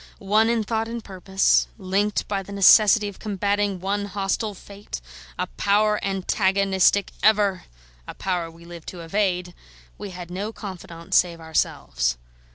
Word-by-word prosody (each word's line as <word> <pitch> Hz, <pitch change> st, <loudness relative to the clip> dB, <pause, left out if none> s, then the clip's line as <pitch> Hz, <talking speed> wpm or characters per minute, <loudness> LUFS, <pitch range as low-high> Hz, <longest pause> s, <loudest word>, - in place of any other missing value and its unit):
One 215 Hz, +3 st, +2 dB
in 230 Hz, -2 st, +1 dB
thought 225 Hz, +1 st, -1 dB
and 230 Hz, 0 st, -5 dB
purpose, 190 Hz, 0 st, +1 dB
linked 200 Hz, +1 st, -1 dB
by 200 Hz, -1 st, -1 dB
the 195 Hz, -, -11 dB
necessity 205 Hz, +2 st, +6 dB
of 200 Hz, -, -9 dB
combating 205 Hz, -1 st, -1 dB
one 200 Hz, +2 st, -1 dB
hostile 200 Hz, +1 st, -2 dB
fate, 200 Hz, -, -9 dB, 0.4 s
a -, -, -1 dB
power 210 Hz, +1 st, +2 dB
antagonistic 195 Hz, 0 st, +2 dB
ever, 205 Hz, -3 st, +3 dB, 0.4 s
a -, -, -8 dB
power 175 Hz, -3 st, -2 dB
we 165 Hz, +1 st, -16 dB
lived 170 Hz, -2 st, -11 dB
to 180 Hz, -, -7 dB
evade, 180 Hz, 0 st, -1 dB, 0.5 s
we 205 Hz, -, -6 dB
had 180 Hz, -1 st, -9 dB
no 200 Hz, +4 st, -4 dB
confidants 175 Hz, -5 st, -4 dB
save 170 Hz, -2 st, -1 dB
ourselves. 65 Hz, -, -1 dB
195 Hz, 145 wpm, -24 LUFS, 180-205 Hz, 0.5 s, necessity